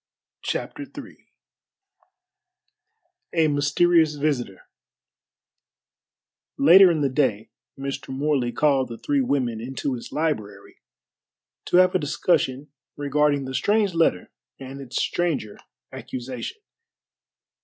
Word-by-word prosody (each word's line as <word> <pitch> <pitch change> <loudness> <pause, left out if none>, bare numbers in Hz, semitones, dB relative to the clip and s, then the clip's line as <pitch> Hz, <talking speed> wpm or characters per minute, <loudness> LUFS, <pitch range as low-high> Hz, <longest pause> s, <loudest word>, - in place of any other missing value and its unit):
CHAPTER - - -4 0.2
III - - -11 2.1
A 160 -2 +3
MYSTERIOUS 150 +2 +3
VISITOR 140 -10 -2 2.0
Later 180 +6 +8
in 160 -3 0
the 140 - +2
day 130 -6 -1 0.3
Mr. 135 0 -5
Morley 135 -2 0
called 135 -1 +2
the 115 - -8
three 285 - 0
women 125 - -1
into 135 +3 -3
his 120 - -7
library 110 -11 -3 0.9
to - - +2
have 185 0 +5
a 185 - +2
discussion 145 -2 0 0.3
regarding 145 -1 +1
the 130 - -6
strange 205 +3 +1
letter 165 - +1 0.3
and 135 +1 -8
its 130 -2 -4
stranger 160 -12 -2 0.3
accusation. 125 - -6
140 Hz, 100 wpm, -24 LUFS, 130-160 Hz, 2.1 s, Later